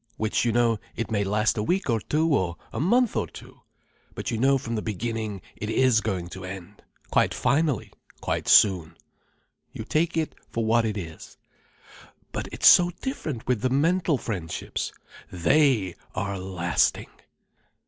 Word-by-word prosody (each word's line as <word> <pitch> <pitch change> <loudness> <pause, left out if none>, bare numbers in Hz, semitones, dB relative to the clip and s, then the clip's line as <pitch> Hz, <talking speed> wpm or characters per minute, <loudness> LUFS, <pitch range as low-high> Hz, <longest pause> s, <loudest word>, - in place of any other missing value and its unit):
Which 110 +2 0
you 120 - +2
know. 115 -1 +2 0.2
It 115 0 -4
may 100 -2 +1
last 105 +3 +1
a - - +1
week 185 - 0
or 115 -3 +1
two, 155 +9 0
or 90 -9 +1 0.2
a - - -3
month 235 - +2
or - - 0
two. - - -14 0.5
But - - -4
you 115 - -2
know 135 +2 +4
from 115 -3 -5
the 110 - -1
beginning 110 -1 -4
it 105 - -5
is 120 -1 +3
going 95 -6 -2
to 95 +1 -9
end—quite 95 +1 -3
finally—quite 145 - -2
soon. 90 -6 +5 0.7
You - - -7
take 165 +2 0
it 160 -1 -1 0.2
for 115 -1 -2
what 115 +1 +3
it 105 -1 -2
is. 80 -4 -9 0.9
But - - -4
it's - - -3
so 175 -1 +8
different 155 - -4
with 125 -4 0
the 130 - +1
mental 165 +3 +2
friendships. 90 -10 -4 0.4
They 110 - +2 0.2
are 100 -1 -2
lasting. 90 -2 0
115 Hz, 155 wpm, -25 LUFS, 100-140 Hz, 0.9 s, so